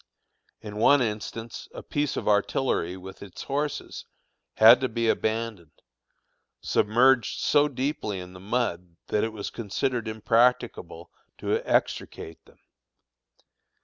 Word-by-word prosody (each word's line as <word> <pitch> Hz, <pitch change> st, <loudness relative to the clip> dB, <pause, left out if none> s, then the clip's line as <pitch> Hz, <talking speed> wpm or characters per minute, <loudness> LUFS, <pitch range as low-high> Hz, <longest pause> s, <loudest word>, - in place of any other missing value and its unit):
In 105 Hz, -1 st, -8 dB
one 140 Hz, +6 st, +5 dB
instance 110 Hz, +1 st, -5 dB
a -, -, -7 dB
piece 145 Hz, -1 st, -2 dB
of -, -, -4 dB
artillery 100 Hz, -3 st, +1 dB
with 95 Hz, +1 st, -11 dB
its 100 Hz, -3 st, -9 dB
horses 145 Hz, +1 st, -3 dB, 0.5 s
had 115 Hz, +3 st, +8 dB
to 130 Hz, -, 0 dB
be 115 Hz, 0 st, -1 dB
abandoned, 110 Hz, -8 st, -2 dB, 0.8 s
submerged 120 Hz, +2 st, +2 dB
so 145 Hz, 0 st, +3 dB
deeply 130 Hz, -7 st, -3 dB
in 90 Hz, 0 st, -9 dB
the 90 Hz, -, -11 dB
mud 90 Hz, -5 st, -2 dB
that 105 Hz, -, +1 dB
it 110 Hz, -, -1 dB
was 105 Hz, -2 st, -6 dB
considered 115 Hz, +2 st, -2 dB
impracticable 115 Hz, +3 st, 0 dB, 0.3 s
to -, -, 0 dB
extricate 80 Hz, 0 st, -1 dB
them. -, -, -22 dB
110 Hz, 120 wpm, -26 LUFS, 100-125 Hz, 0.8 s, had